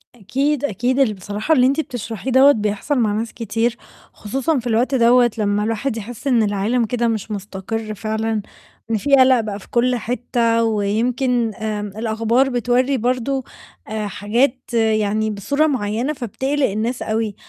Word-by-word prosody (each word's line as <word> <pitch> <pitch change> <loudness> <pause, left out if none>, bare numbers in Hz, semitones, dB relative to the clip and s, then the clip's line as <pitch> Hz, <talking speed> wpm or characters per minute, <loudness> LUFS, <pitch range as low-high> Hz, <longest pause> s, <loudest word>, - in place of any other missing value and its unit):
أكيد، 270 +7 -1
أكيد 245 +3 -1
ال 255 -6 +3
بصراحة 205 - -2
اللي 250 -3 +5
أنتِ 275 +4 +1
بتشرحيه 245 -3 -4
دَوّة 265 +3 +7
بيحصل 215 +4 -1
مع 215 -3 +2
ناس 225 +2 -3
كتير، 230 +1 -1 0.4
خصوصًا 270 +7 -1
في 245 - -6
الوقت 240 +4 +1
دَوّة 240 0 +5
لمّا 205 -1 +1
الواحد 225 +2 -2
يحِس 235 +4 -7
إن 240 -5 +3
العالم 210 +4 0
كده 235 +1 0
مش 220 -1 -2
مُستقر 210 +2 -5
فعلًا، 220 +1 -2 0.5
إن 225 - +2
في 275 +6 +3
قَلق 260 -1 +5
بقى 210 -2 -4
في - - -16
كل 250 +1 +2
حتّة 235 -1 0
ويمكن 230 +3 0
آمم، 215 -2 -3
الأخبار 230 +4 +1
بتوَرّي 250 +2 +1
برضه 255 +3 -1 0.4
آآ، 215 -1 -3
حاجات 240 +6 -1
يعني 220 -1 +1
بصورة 280 +10 0
معيّنة 245 +1 -1
فبتقلِق 265 +3 -1
الناس 220 +5 -2
أوي. 220 -2 -2
230 Hz, 155 wpm, -20 LUFS, 215-255 Hz, 0.5 s, دَوّة